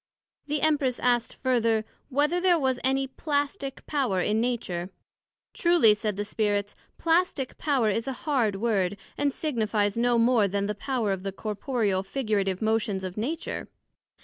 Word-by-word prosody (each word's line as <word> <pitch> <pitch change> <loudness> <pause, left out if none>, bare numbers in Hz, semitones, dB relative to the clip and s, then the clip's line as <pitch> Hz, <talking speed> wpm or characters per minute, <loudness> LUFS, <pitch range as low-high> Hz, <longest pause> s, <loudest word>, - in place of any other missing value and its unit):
The 295 -1 -1
Empress 290 -5 +2
asked 240 -2 +1
further, 230 -4 +1 0.2
Whether 295 +6 +1
there 360 -2 +4
was 265 -4 0
any 270 +1 +2
Plastick 285 +1 -3
power 260 -11 0
in 210 +4 +1
Nature? 190 -8 -2 0.6
Truly, 340 - +5
said 210 -1 -2
the 205 +1 -3
Spirits, 205 -1 -1 0.2
Plastick 330 -5 +1
power 275 -7 +2
is 225 +5 -2
a 270 - -1
hard 245 -9 +2
word, 200 -3 0 0.2
& 290 - +2
signifies 220 -8 -1
no 240 0 +3
more 230 -3 +4
then 200 +1 -1
the 210 - -1
power 230 -1 -1
of 190 -1 -2
the 195 0 -3
corporeal, 210 -1 -1
figurative 200 -3 -1
motions 220 -3 0
of 185 -1 -5
Nature. 290 +10 -3
230 Hz, 150 wpm, -27 LUFS, 205-275 Hz, 0.6 s, Truly